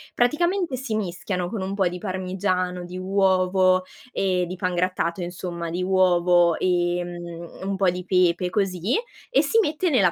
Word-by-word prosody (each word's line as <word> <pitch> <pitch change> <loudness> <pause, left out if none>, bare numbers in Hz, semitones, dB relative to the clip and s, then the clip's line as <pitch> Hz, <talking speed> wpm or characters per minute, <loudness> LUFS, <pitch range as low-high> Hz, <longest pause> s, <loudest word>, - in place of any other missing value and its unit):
praticamente 340 +4 +1
si 250 -4 -3
mischiano 180 -2 -3
con 210 -1 -4
un 190 +1 -3
po' 195 -2 +2
di 180 - -6
parmigiano, 185 -1 -2
di 180 +1 -7
uovo 185 -1 +3 0.3
e 185 -4 0
di 180 - -5
pangrattato 180 -1 -1
insomma, 175 -1 -5
di 175 +2 -2
uovo, 175 -2 +4
ehm, 175 -1 -2
un 195 0 -1
po' 190 -1 +3
di 180 +1 -5
pepe 180 -1 +2
e - - -1
così 190 0 0 0.3
e - - +4
si 455 - +2
mette 330 0 0
nella 195 - +4
185 Hz, 160 wpm, -24 LUFS, 175-195 Hz, 0.3 s, uovo